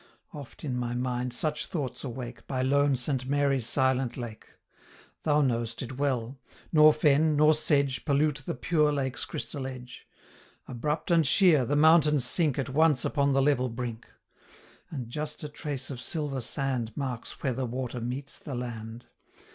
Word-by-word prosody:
145 150 - -7
Oft - - -18
in 130 -4 -2
my 120 0 -2
mind 125 0 -2
such 150 +5 -1
thoughts 140 -8 -4
awake, 125 -2 -7
By 130 -1 -1
lone 140 +1 +3
Saint 130 +1 -1
Mary's 140 -3 +1
silent 130 -1 +1
lake; 120 -3 -7 0.7
Thou 150 -1 +2
know'st 115 -3 -1
it 130 +2 -8
well, 130 -2 -1 0.3
nor 155 -1 +7
fen, 150 +1 +3
nor 150 +1 +5
sedge, 145 -4 +1
Pollute 145 -1 +1
the - - -4
pure 150 +3 +2
lake's 135 -3 -2
crystal 135 -3 -5
edge; 125 -1 -10 0.6
Abrupt 150 +7 -3
and 165 -4 +4
sheer, 160 -5 +5
the 145 - 0
mountains 150 -3 +5
sink 150 +1 +1
150 135 -1 -2
At - - -8
once 155 -4 +4
upon 140 -2 +1
the 135 0 +3
level 130 -3 +2
brink; 120 -1 -6 0.8
And 130 -6 -5
just 150 +6 -5
a - - -3
trace 145 -3 -5
of 125 -2 -6
silver 145 -2 -2
sand 125 -2 -2
Marks 130 -5 -5
where 130 -3 +1
the 130 +1 -3
water 125 0 -4
meets 130 +4 -5
the 140 - -6
land. 115 -1 -6
135 Hz, 170 wpm, -28 LUFS, 125-150 Hz, 0.8 s, nor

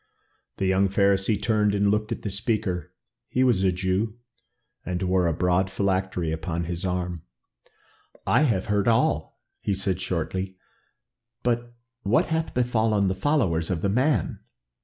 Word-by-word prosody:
The 95 - -1
young 95 +1 +3
Pharisee 100 +1 +2
turned 105 -2 +2
and 100 0 +3
looked 105 +1 0
at - - -4
the 105 - -3
speaker. 100 -4 -2 0.4
He 130 - +2
was 120 -7 +3
a 95 -1 +3
Jew, 95 +5 -1 0.7
and 90 -1 -3
wore 90 -1 +2
a - - +2
broad 90 +3 +1
phylactery 95 -4 -1
upon 85 +1 -3
his 85 +1 -4
arm. 90 -2 -2 1.0
"I - - +4
have 115 -11 +2
heard 105 0 +1
all," 115 -1 +1 0.2
he 100 - -1
said 95 -1 -1
shortly. 95 +2 -3 0.9
"But 120 0 -1 0.3
what 105 +2 +2
hath 160 0 -2
befallen 110 -5 +2
the - - +1
followers 95 - +1
of 85 -3 -2
the 100 - +2
man? 125 - +1
95 Hz, 150 wpm, -25 LUFS, 90-110 Hz, 1.0 s, I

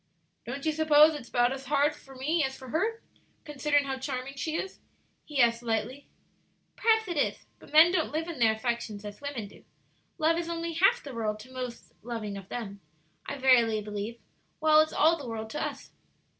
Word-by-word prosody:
"Don't 275 +4 -5
you 315 - +3
suppose 310 0 +6
it's 285 -6 -8
about 245 0 +2
as 270 0 -8
hard 290 +2 +2
for 270 0 -15
me 305 +5 0
as 265 0 -3
for 260 -1 -11
her, 430 - -1 0.4
considering 290 -1 +1
how 265 -1 -3
charming 260 0 -4
she 310 +3 -3
is?" 380 - -4 0.5
he 295 -2 -4
asked, 235 -1 +4
lightly. 235 +4 -3 0.7
"Perhaps 445 -2 +2
it 345 -3 -3
is; 285 - 0
but - - -16
men 315 +3 +8
don't 355 -4 0
live 320 +2 -2
in 335 -6 -6
their 225 -2 +5
affections 220 -2 -3
as 205 +3 -8
women 280 -7 -5
do; - - -17 0.5
love 330 0 +2
is 340 -1 -4
only 335 0 -3
half 390 +9 +3
the 275 - -8
world 215 -2 -2
to 250 - -14
the - - -15
most 250 -2 -7
loving 220 -3 -5
of 195 -1 -9
them, 200 -4 -6 0.5
I 285 - -4
verily 240 -5 +4
believe, 210 +2 -5 0.4
while 310 0 +5
it's 310 - 0
all 325 +3 +4
the 275 - -7
world 220 -1 -5
to - - -3
us." - - -6
270 Hz, 200 wpm, -28 LUFS, 235-315 Hz, 0.7 s, men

